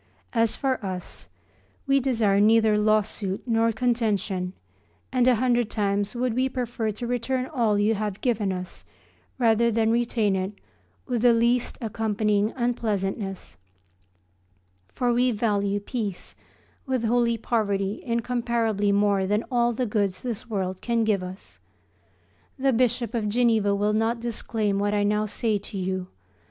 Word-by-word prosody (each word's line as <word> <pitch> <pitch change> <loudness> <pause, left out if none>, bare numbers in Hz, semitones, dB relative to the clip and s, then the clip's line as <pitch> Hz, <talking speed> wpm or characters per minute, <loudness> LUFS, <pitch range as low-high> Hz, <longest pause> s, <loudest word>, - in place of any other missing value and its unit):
As 230 -2 +2
for 265 -5 -1
us, 185 -2 -6 0.6
we 275 -1 +3
desire 225 -7 +2
neither 220 0 +5
law 215 0 +3
suit 195 -2 -4
nor 230 -1 +2
contention, 215 -6 -1 0.6
and 250 -1 +3
a 255 - +5
hundred 240 -1 +1
times 205 0 -1
would 245 -1 0
we 260 +2 +1
prefer 240 -3 -2
to 215 +4 -5
return 245 +2 -1
all 235 -8 +1
you 210 +2 +3
have 210 -2 -3
given 215 -6 0
us 180 -1 -6 0.5
rather 235 -1 +3
than 225 0 +2
retain 230 -4 +1
it 190 +2 -2 0.5
with 245 -4 -1
the 240 0 +6
least 235 +1 +1
accompanying 215 -1 0
unpleasantness: 200 - -2 1.3
for 245 - 0
we 250 +1 +3
value 205 -3 0
peace 205 -3 -5 0.5
with 260 -3 0
holy 235 0 +2
poverty 205 -3 -1
incomparably 235 -3 0
more 200 -1 +2
than 210 +3 0
all 240 -1 +2
the 245 +2 -1
goods 205 -4 -1
this 235 -2 -4
world 190 -3 -3
can 235 -1 +1
give 210 -3 +1
us. 180 - -10 1.0
The 270 0 +2
Bishop 240 0 +1
of 220 -3 -1
Geneva 220 -3 +2
will 205 +1 +1
not 225 +2 +1
disclaim 220 -3 -2
what 205 +1 0
I 205 - +2
now 210 +1 +1
say 215 0 0
to 200 0 -8
you. 185 0 -2
220 Hz, 145 wpm, -25 LUFS, 205-240 Hz, 1.3 s, the